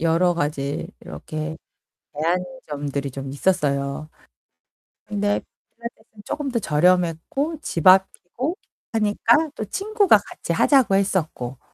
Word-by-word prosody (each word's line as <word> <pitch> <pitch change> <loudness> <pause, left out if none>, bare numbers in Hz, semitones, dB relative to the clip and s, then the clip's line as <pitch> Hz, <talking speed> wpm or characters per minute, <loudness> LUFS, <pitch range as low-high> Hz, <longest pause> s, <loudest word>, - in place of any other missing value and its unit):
여러 170 +2 +3
가지 145 -3 -2
이렇게 155 - -6 0.6
제한점들이 150 - -2
좀 135 +1 -6
있었어요. 145 -2 0 1.0
근데 205 0 0 0.4
필라테스는 225 -3 -10
쪼끔 290 -2 -3
더 235 - +1
저렴했고 180 - +1
집 165 - -3
앞이고 190 - +3 0.4
하니까 225 +8 +3
또 215 - -4
친구가 405 - +3
같이 - - -5
하자고 260 -9 +4
했었고. 160 -10 -1
180 Hz, 255 characters per minute, -23 LUFS, 150-225 Hz, 1.0 s, 하자고